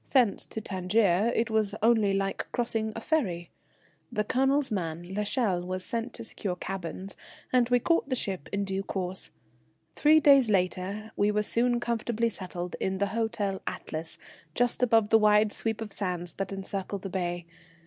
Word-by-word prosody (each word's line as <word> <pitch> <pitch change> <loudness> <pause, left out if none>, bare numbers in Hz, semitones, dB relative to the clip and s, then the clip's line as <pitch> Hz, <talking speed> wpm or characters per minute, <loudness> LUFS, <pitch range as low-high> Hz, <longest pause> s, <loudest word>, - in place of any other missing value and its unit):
Thence 245 -7 +3
to - - -5
Tangier 195 +2 +2 0.2
was 215 -2 +1
only 220 -3 +4
like 195 0 -1
crossing 225 -2 0
a - - -3
ferry. 190 - -1 0.6
The 210 -3 0
Colonel's 270 +4 +2
man, 175 -2 -3
l'Echelle, 210 -2 0
was 185 0 -3
sent 230 +4 -2
to 230 - -7
secure 200 -4 -3
cabins, 190 +1 -5 0.4
and 250 -1 +4
we 245 - +5
caught 330 +2 +1
the 260 - +1
ship 190 - -3
in 200 0 -1
due 195 0 -2
course. 190 -1 -3 0.6
Three 310 +1 +5
days 275 -5 +6
later 195 +2 0
we 205 +1 +2
were 210 0 +1
soon 240 +2 +2
comfortably 235 -1 0
settled 180 -4 -5
in 190 0 -1
the 200 - +1
Hotel 210 -4 -1
Atlas, 160 +1 -5 0.4
just 245 +1 +2
above 225 -3 +4
the 225 - +6
wide 210 0 +4
sweep 225 -1 -1
of 210 -3 -5
sands 180 -3 -3
that 195 0 -4
encircle 195 0 -4
the 195 - -6
bay. 175 -2 -2
205 Hz, 165 wpm, -28 LUFS, 185-230 Hz, 0.6 s, days